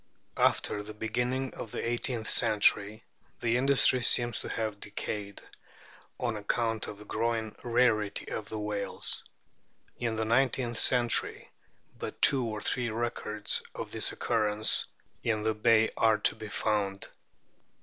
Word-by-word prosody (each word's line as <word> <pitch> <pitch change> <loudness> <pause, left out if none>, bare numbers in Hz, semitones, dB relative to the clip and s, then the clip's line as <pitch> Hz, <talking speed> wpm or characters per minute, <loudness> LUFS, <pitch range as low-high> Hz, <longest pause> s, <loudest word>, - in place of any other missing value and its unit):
After 105 - +1
the 105 +1 -9
beginning 120 +4 -2
of 115 - -7
the - - -3
eighteenth 120 -1 -2
century 105 -1 +3 0.4
the 120 -1 +1
industry 130 -1 +4
seems 120 -1 +3
to - - -7
have 110 -3 -3
decayed, 100 -1 -6 0.8
on 120 -3 -1
account 110 +1 -1
of 105 - -7
the 105 - -13
growing 115 -1 -2
rarity 115 -4 +1
of 105 -1 -5
the 110 - -5
whales. 105 -1 -3 0.8
In 115 -2 -1
the 110 0 -1
nineteenth 120 0 +1
century 120 -3 +1 0.5
but - - -6
two 135 -2 +5
or 110 -2 -4
three 125 -2 -1
records 110 -2 -2
of - - -6
its - - +1
occurrence 110 -2 +2 0.4
in 110 -2 0
the 110 0 +1
Bay 110 +1 +3
are 110 -1 +3
to - - +3
be 110 - -9
found. 100 -2 -1
110 Hz, 140 wpm, -29 LUFS, 105-120 Hz, 0.8 s, two